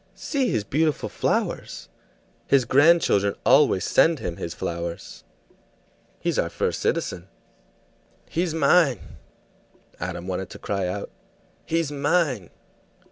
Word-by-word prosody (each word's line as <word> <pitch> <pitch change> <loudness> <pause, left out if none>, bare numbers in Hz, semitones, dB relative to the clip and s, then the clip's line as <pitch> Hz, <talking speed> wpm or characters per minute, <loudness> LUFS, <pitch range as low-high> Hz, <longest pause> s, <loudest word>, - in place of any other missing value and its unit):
"See 275 -4 -1
his 110 -3 0
beautiful 150 +8 0
flowers! - - -2 0.6
His 135 -3 +3
grandchildren 135 - +4
always 95 - +4
send 165 -1 +4
him 85 -9 -5
his 85 -1 -5
flowers." 85 0 -5 1.0
"He's - - -1
our - - 0
first - - -2
citizen." 90 0 -2 1.0
"He's 170 0 -1
mine!" 160 - +2 0.8
Adam 90 0 -5
wanted 95 0 -4
to - - -10
cry 100 -2 -2
out. 100 +3 -5 0.6
"He's 165 -2 0
mine!" 145 - 0
125 Hz, 110 wpm, -24 LUFS, -, 1.0 s, grandchildren